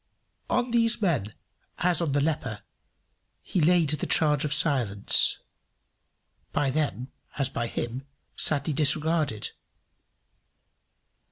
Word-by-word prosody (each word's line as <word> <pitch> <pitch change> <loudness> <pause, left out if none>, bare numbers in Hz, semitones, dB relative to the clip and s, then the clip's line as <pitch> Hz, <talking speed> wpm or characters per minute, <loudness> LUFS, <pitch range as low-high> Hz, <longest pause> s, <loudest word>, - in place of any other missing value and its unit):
On 250 -1 0
these 230 -1 +2
men, 165 - 0 0.5
as 175 -1 +2
on 155 -5 -1
the 145 - +2
leper, 140 -8 -2 0.8
he 180 - -1
laid 165 -1 +3
the 150 - -1
charge 150 -3 +2
of 150 - -2
silence, 130 -10 +2 1.1
by 135 -2 0
them, 135 -3 -2 0.3
as 140 -3 0
by 115 - -3
him, 125 +4 -5 0.3
sadly 150 0 +1
disregarded. 150 -5 +1
150 Hz, 105 wpm, -26 LUFS, 130-165 Hz, 1.1 s, laid